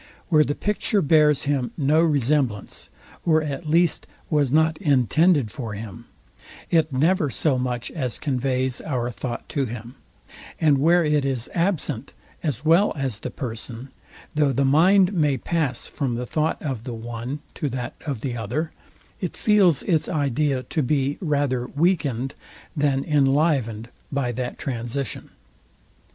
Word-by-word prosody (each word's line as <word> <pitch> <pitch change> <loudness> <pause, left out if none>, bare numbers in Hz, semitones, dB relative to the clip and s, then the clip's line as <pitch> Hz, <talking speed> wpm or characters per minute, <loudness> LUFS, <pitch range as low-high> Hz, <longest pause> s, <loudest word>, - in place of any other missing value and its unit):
Where 155 -3 +5
the 145 - -2
picture 210 0 0
bears 150 -1 +4
him 140 -4 -1
no 150 +1 +3
resemblance, 140 -7 0 0.3
or 160 -2 +3
at 150 +1 -4
least 170 +1 +2 0.2
was 145 -4 +2
not 160 +1 +3
intended 145 - +3
for 115 -3 -5
him, 110 +2 -8 0.6
it 160 -3 +3
never 155 +3 +2
so 135 0 +1
much 125 -1 -2
as 130 -8 -2
conveys 130 -2 -1
our 125 -5 -2
thought 120 +2 -5
to 140 -2 0
him: 120 0 -7 0.7
And 150 -4 +4
where 170 +3 +4
it 150 -1 +2
is 130 -4 -2
absent, 160 - -1 0.3
as 145 -3 -3
well 170 +6 +4
as 135 -7 -3
the - - -5
person; 120 +1 -6 0.4
though 150 -2 +2
the 135 +2 +1
mind 180 +7 +5
may 150 -6 +2
pass 145 -3 -1
from 130 -4 -2
the 125 +1 -3
thought 155 +4 -1
of 130 -7 -3
the 125 -2 -5
one 120 +5 -5
to 145 - -2
that 125 +2 -4
of 135 -7 -4
the 125 -2 -3
other; 125 +9 -3 0.5
it 180 - -4
feels 200 -8 +4
its 165 -5 +1
idea 145 -3 0
to 155 - -2
be 140 +1 0
rather 140 -6 0
weekend 145 -6 0 0.4
than 140 -3 +1
inlivened 135 -6 +2 0.3
by 135 -3 0
that 125 +1 -4
transition. 125 +1 -4
140 Hz, 145 wpm, -23 LUFS, 125-155 Hz, 0.7 s, Where